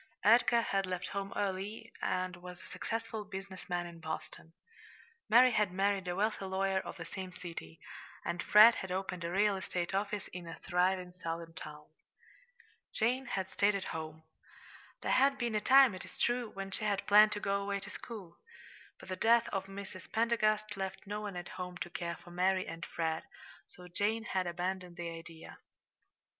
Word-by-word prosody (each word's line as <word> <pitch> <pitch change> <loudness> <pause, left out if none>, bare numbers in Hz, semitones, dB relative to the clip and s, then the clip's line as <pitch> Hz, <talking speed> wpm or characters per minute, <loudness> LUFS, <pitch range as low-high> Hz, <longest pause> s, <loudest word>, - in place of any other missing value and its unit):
Edgar 235 +1 +6
had 195 -3 0
left 180 -1 -3
home 200 0 -3
early, 205 +3 -3
and 185 -1 -1
was 180 0 -10
a - - -13
successful 225 -1 -3
business 195 -2 -8
man 175 -1 -1
in 170 -1 -9
Boston. 160 0 -6 0.8
Mary 250 +3 +8
had 210 -4 +2
married 195 0 +1
a 175 - -1
wealthy 210 0 0
lawyer 190 0 +1
of - - -7
the - - -6
same 190 -2 -6
city; 165 - -8 0.5
and 175 - -1
Fred 215 +3 +9
had 190 -4 -5
opened 185 -1 -3
a 170 - -2
real 200 +2 +3
estate 180 -1 -3
office 200 0 -1
in 180 -2 -7
a 165 - -6
thriving 180 0 +1
Southern 165 0 -4
town. 150 -1 -9 1.1
Jane 255 +4 +1
had 190 -5 -2
stayed 200 0 +3
at 195 - -2
home. 160 0 -6 0.8
There - - 0
had 275 +1 +4
been 240 -2 -1
a 210 - +1
time, 265 -2 +7
it 185 - -6
is - - -11
true, 240 -1 +1
when 195 -1 -6
she 205 - -4
had 205 -2 0
planned 210 +1 +7
to 205 - -3
go 200 0 0
away 200 0 -1
to 195 - -7
school; 200 -8 -9 0.6
but - - -12
the 185 - -3
death 230 +4 +4
of 195 0 -2
Mrs. 195 -2 -8
Pendergast 215 -2 +2
left 190 0 -4
no 210 +1 -4
one 205 -3 -5
at 175 0 -6
home 180 -1 -5
to 175 - -5
care 170 -2 -3
for 175 - -14
Mary 185 +1 +2
and 165 0 -6
Fred, 160 -1 -1 0.5
so 180 0 -12
Jane 210 +5 0
had 185 -4 -1
abandoned 180 0 -3
the 170 -1 -4
idea. 165 0 -10
190 Hz, 185 wpm, -33 LUFS, 180-210 Hz, 1.1 s, Fred